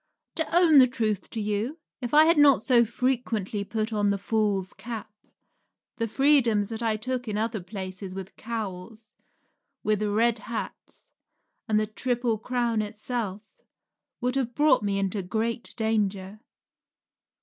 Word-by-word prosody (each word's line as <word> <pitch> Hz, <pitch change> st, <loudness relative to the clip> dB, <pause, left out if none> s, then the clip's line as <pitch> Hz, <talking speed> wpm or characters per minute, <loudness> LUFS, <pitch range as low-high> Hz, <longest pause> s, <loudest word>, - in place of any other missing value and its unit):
To 325 Hz, 0 st, -1 dB
own 325 Hz, -5 st, +7 dB
the 255 Hz, -, +7 dB
truth 220 Hz, -5 st, -2 dB
to 225 Hz, -, -4 dB
you, 210 Hz, +8 st, -2 dB, 0.2 s
if 240 Hz, -1 st, -4 dB
I 305 Hz, +1 st, +7 dB
had 330 Hz, -1 st, +4 dB
not 280 Hz, -6 st, +6 dB
so 245 Hz, -3 st, +5 dB
frequently 230 Hz, -4 st, -1 dB
put 220 Hz, +1 st, -3 dB
on 205 Hz, -1 st, +2 dB
the 200 Hz, -, +1 dB
fool's 200 Hz, -3 st, -1 dB
cap, 215 Hz, +1 st, -7 dB, 0.8 s
the 230 Hz, -1 st, -1 dB
freedoms 235 Hz, -5 st, +3 dB
I 225 Hz, -1 st, -1 dB
took 250 Hz, +2 st, -3 dB
in 210 Hz, -1 st, -2 dB
other 220 Hz, -1 st, -1 dB
places 185 Hz, 0 st, -7 dB
with 190 Hz, -1 st, -8 dB
cowls, 215 Hz, -1 st, -6 dB, 0.7 s
with 215 Hz, -1 st, +1 dB
Red 220 Hz, +2 st, +2 dB
Hats, 225 Hz, +2 st, -7 dB, 0.6 s
and 215 Hz, -1 st, +3 dB
the 215 Hz, -, +1 dB
Triple 235 Hz, +1 st, -1 dB
Crown 235 Hz, -1 st, 0 dB
itself, 215 Hz, -1 st, -4 dB, 0.8 s
would 250 Hz, +1 st, -1 dB
have 245 Hz, -3 st, -2 dB
brought 300 Hz, -1 st, +4 dB
me 200 Hz, -1 st, -1 dB
into 195 Hz, +1 st, -1 dB
great 225 Hz, +6 st, -2 dB
danger. 210 Hz, -3 st, -1 dB
220 Hz, 140 wpm, -26 LUFS, 205-245 Hz, 0.8 s, own